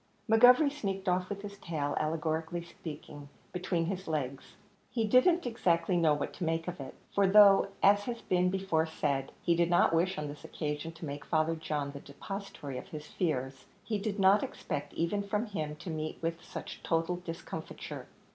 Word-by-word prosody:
McGovery 250 +6 +7
sneaked 195 -8 -4
off 180 0 +1
with 200 0 -5
his 200 -1 -8
tail, 150 -6 -2
allegorically 160 +2 -1
speaking, 150 -4 -9 0.2
between 180 -2 0
his 190 +1 -4
legs. 140 -4 -3 0.3
He 230 -3 0
didn't 260 - +4
exactly 180 -7 +1
know 160 -3 +4
what 145 - -3
to - - -5
make 165 0 -1
of 180 -2 -4
it; 135 - -7 0.2
for 200 -1 +4
though, 200 0 +7 0.2
as 205 +1 +5
has 235 -1 -3
been 180 0 +2
before 185 -4 +1
said, 140 -4 -1
he 170 - +3
did 170 0 +2
not 175 -1 +4
wish 175 +3 +2
on 150 0 -3
this 145 0 -9
occasion 150 +1 -4
to 165 0 -8
make 145 0 -5
Father 160 0 +1
John 150 -3 -3
the 140 - -8
depositary 145 -3 -7
of - - -11
his 150 -1 -7
fears, 135 -6 -2 0.2
he 215 -2 -2
did 205 0 -2
not 195 +2 +6
expect 145 -4 -4
even 170 +5 0
from 205 +3 -1
him 155 -8 -4
to 160 +3 -7
meet 155 0 -4
with 165 0 -3
such - - -8
total 165 +2 0
discomfiture. 175 -1 -7
170 Hz, 185 wpm, -31 LUFS, 155-195 Hz, 0.3 s, McGovery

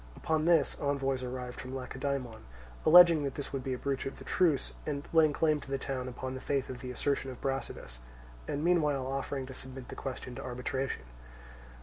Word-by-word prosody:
Upon 155 -1 0
this, 165 -4 +4
envoys 135 -2 0
arrived 125 0 -5
from 130 +1 -6
Lacedaemon, 130 -2 -3 0.5
alleging 170 -2 +9
that 140 -2 -2
this 145 - -5
would 135 -2 -2
be 130 - -1
a - - -2
breach 135 +1 -2
of 135 - -6
the - - -10
truce, 165 -7 +2
and 145 -1 -3
laying 160 -2 +6
claim 155 0 +2
to - - -11
the 135 - 0
town 130 -1 -3
upon 130 +1 -5
the 130 - -6
faith 135 -2 -1
of 125 - -7
the 125 - -6
assertion 135 +2 -1
of 130 - -8
Brasidas, 135 - -4 0.5
and 145 - -2
meanwhile 150 -6 +3
offering 135 0 -2
to 130 - -8
submit 130 0 -7
the - - -6
question 130 -2 -5
to - - -7
arbitration. 125 - -3
135 Hz, 200 wpm, -31 LUFS, 130-145 Hz, 0.5 s, alleging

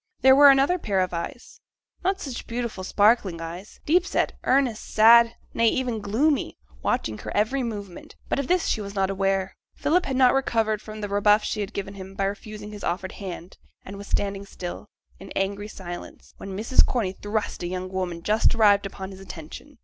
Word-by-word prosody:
There 265 0 +7
were 285 +1 +9
another 275 +7 +4
pair 200 - 0
of 185 -1 0
eyes, 170 +8 -6 0.4
not 380 +2 +1
such 270 -10 -6
beautiful, 235 -5 -4
sparkling 205 -3 +2
eyes, 170 +5 -8
deep 345 +4 +4
set, 380 - 0
earnest, 255 -4 +2
sad, 230 +1 +6 0.2
nay, 230 - +3
even 245 -1 0
gloomy, 260 +9 0 0.2
watching 110 - -1
her - - -6
every 220 +6 +1
movement; 205 -6 -6
but - - -1
of 280 - -2
this 360 -1 +2
she 215 - 0
was 200 0 -7
not 195 -1 +1
aware. 195 -1 0 0.2
Philip 350 +4 +1
had 265 - -2
not 255 -1 +5
recovered 225 -5 +1
from 215 0 -9
the 205 - -2
rebuff 205 +1 +3
she - - -3
had 200 +1 -4
given 195 -2 -5
him 195 0 -10
by 200 - -1
refusing 210 +1 -6
his 205 -1 -9
offered 185 +2 -2
hand, 185 -2 -8 0.3
and 195 - -8
was 200 0 -9
standing 200 0 -2
still, 180 +2 -7 0.3
in 195 - -11
angry 200 +1 -1
silence, 175 -4 -9
when 195 -1 -7
Mrs. 225 +5 +4
Corney 225 -7 -1
thrust 205 +2 -3
a 175 - -2
young 185 +1 -4
woman 180 -3 -4
just 215 +4 +3
arrived 205 -3 +4
upon 190 0 -8
his 190 - -11
attention. 195 - -10
205 Hz, 195 wpm, -25 LUFS, 190-235 Hz, 0.4 s, were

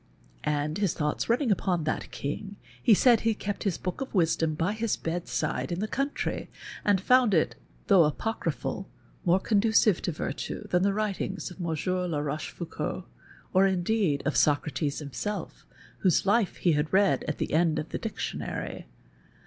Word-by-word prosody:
"' - - -31
And, 150 +3 -1
his 200 -6 +1
thoughts 150 +5 -1
running 240 0 +2
upon 180 -3 +1
that 155 - -2
King, 195 +8 -5 0.3
he 230 -5 +6
said 240 +1 +5
he 225 -1 +1
kept 205 0 -4
his 195 -5 +1
Book 180 +5 -4
of 265 - -5
Wisdom 160 -3 +2
by 165 +6 0
his 220 0 -1
bedside 170 +1 -2
in 170 - -2
the 215 - -1
country 275 +5 -2 0.3
and 205 -2 +3
foiuid 245 0 +4
it, 120 -7 +2 0.3
though 175 -6 +6
Apoeryi)hal, 190 0 -3 0.4
more 180 +2 +4
conducive 215 -1 +3
to - - -1
virtue 155 - -4
than 180 - +2
the 200 +1 +3
writings 195 -3 -2
of 180 - -12
Mon 170 -2 -1
sieur 180 +3 -1
La 160 -4 -1
Rochefoucauld 150 +3 -4 0.5
or, 190 +1 +5
indeed, 185 -4 +1
of 155 - 0
Socrates 150 0 +1
him 140 -3 -8
self, 210 0 -5 0.3
whose 185 -3 +3
life 205 0 +2
he 175 - +2
had 150 0 0
read 195 +1 +3
at 150 - -2
the - - -3
end 160 0 +3
of 155 - -3
the - - -4
Dic 225 - -5
tionary. - - -4
185 Hz, 175 wpm, -28 LUFS, 155-205 Hz, 0.5 s, he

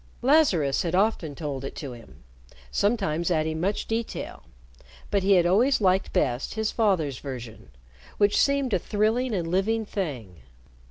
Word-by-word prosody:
Lazarus 245 - +3
had 170 0 -1
often 185 -7 0
told 140 -4 -5
it 135 - -6
to 140 -4 -6
him, 115 - -14 0.5
sometimes 195 -6 0
adding 160 -1 0
much 200 +3 -1
detail, 225 +1 -4 0.7
but 200 - +2
he 195 +1 +3
had 175 -2 +4
always 230 +10 +3
liked 190 -2 +2
best 125 - -1
his 220 -1 -1
father's 180 - 0
version, 120 - -8 0.5
which 205 0 +3
seemed 280 -4 +1
a 190 - +3
thrilling 220 +6 0
and 170 -3 -2
living 210 +6 0
thing. 130 - -5
185 Hz, 150 wpm, -26 LUFS, 150-220 Hz, 0.7 s, had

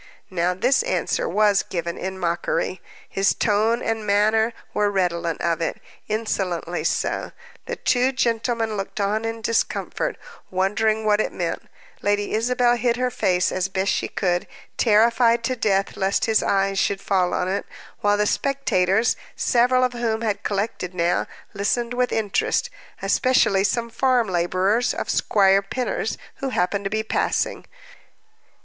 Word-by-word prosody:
Now 180 0 0
this 250 - +3
answer - - -1
was 210 -2 +3
given 170 -1 -4
in 190 0 -5
mockery; 175 +1 -1 0.3
his 195 0 +1
tone 220 +3 +1
and 225 -1 -1
manner 215 +2 +2 0.2
were 210 0 +2
redolent 175 -4 -1
of 170 0 0
it, 165 - -2 0.3
insolently 190 -6 -2
so. - - -1 0.3
The - - -3
two 250 +1 +2
gentlemen 230 -3 0
looked 195 +2 -5
on 210 +3 0
in 225 0 -4
discomfort, 230 - -1 0.3
wondering 215 +4 +1
what 210 0 +3
it - - -2
meant; - - -4 0.3
Lady 205 0 0
Isabel 240 +2 +2
hid 240 0 +1
her 250 0 0
face 180 -5 +1
as 185 0 -1
best 190 0 0
she - - -1
could, 175 -2 -1 0.3
terrified 230 +1 +3
to 255 +3 0
death 195 -4 0
lest 195 0 +1
his 220 -1 +2
eyes 195 0 +1
should 195 0 +1
fall 185 -2 +1
on 180 - -1
it: 195 +2 -2 0.3
while 205 0 +2
the 210 - +2
spectators, 225 -5 +1 0.2
several 255 +1 +3
of 250 -1 +1
whom 230 -2 -1
had 210 -3 -1
collected 200 -3 -3
now, 170 0 +1 0.3
listened 235 +4 -1
with 250 0 0
interest, 215 -3 0 0.3
especially 250 -7 +3
some 235 +3 -1
farm 250 -1 +2
laborers 185 +6 +1
of - - -2
Squire 195 -1 +3
Pinner's 220 +2 -3 0.2
who 275 - -3
had 255 - -2
happened 195 +3 0
to - - 0
be 220 +1 -1
passing. 220 - -1
210 Hz, 150 wpm, -23 LUFS, 190-235 Hz, 0.3 s, this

